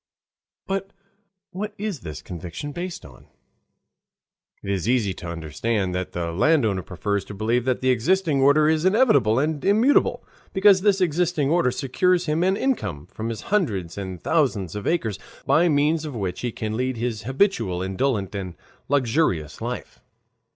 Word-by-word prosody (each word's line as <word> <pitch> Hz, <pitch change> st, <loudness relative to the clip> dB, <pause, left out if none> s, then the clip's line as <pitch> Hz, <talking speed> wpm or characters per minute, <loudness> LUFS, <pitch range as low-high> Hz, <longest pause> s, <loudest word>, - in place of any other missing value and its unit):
But 195 Hz, 0 st, -3 dB, 0.6 s
what 205 Hz, +3 st, -5 dB
is 205 Hz, -6 st, -3 dB
this 75 Hz, -, -8 dB
conviction 90 Hz, -, -6 dB
based 175 Hz, +3 st, -6 dB
on? 65 Hz, -3 st, -15 dB, 1.4 s
It 100 Hz, -, -3 dB
is 95 Hz, +2 st, -1 dB
easy 115 Hz, -6 st, +2 dB
to 90 Hz, -, -9 dB
understand 90 Hz, +5 st, -2 dB
that 90 Hz, 0 st, -3 dB
the 85 Hz, -1 st, -2 dB
landowner 110 Hz, -, +2 dB
prefers 95 Hz, +4 st, -2 dB
to 105 Hz, -, -9 dB
believe 115 Hz, +4 st, 0 dB
that 130 Hz, -1 st, 0 dB
the 130 Hz, 0 st, +3 dB
existing 150 Hz, +4 st, +2 dB
order 145 Hz, +3 st, +5 dB
is 155 Hz, 0 st, +2 dB
inevitable 185 Hz, -, +4 dB
and 150 Hz, +1 st, 0 dB
immutable, 225 Hz, +8 st, +3 dB, 0.3 s
because 195 Hz, -1 st, +5 dB
this 200 Hz, -1 st, +3 dB
existing 170 Hz, -3 st, +1 dB
order 170 Hz, -6 st, +3 dB
secures 175 Hz, +8 st, +1 dB
him 155 Hz, +1 st, 0 dB
an 190 Hz, +2 st, +2 dB
income 100 Hz, -, -2 dB
from 110 Hz, +1 st, -4 dB
his 110 Hz, -2 st, -5 dB
hundreds 100 Hz, -, 0 dB
and 95 Hz, -3 st, -6 dB
thousands 115 Hz, -, +1 dB
of 105 Hz, -, -4 dB
acres, 115 Hz, -, 0 dB, 0.3 s
by 160 Hz, +6 st, +4 dB
means 150 Hz, +2 st, +2 dB
of 150 Hz, -4 st, -6 dB
which 95 Hz, -5 st, -3 dB
he 120 Hz, -, -2 dB
can 110 Hz, 0 st, -4 dB
lead 130 Hz, +1 st, -1 dB
his 115 Hz, -2 st, -2 dB
habitual 120 Hz, -, +1 dB
indolent 100 Hz, 0 st, -1 dB
and 95 Hz, -3 st, -5 dB, 0.3 s
luxurious 115 Hz, -, +1 dB
life. -, -, -6 dB
130 Hz, 160 wpm, -23 LUFS, -, 1.4 s, order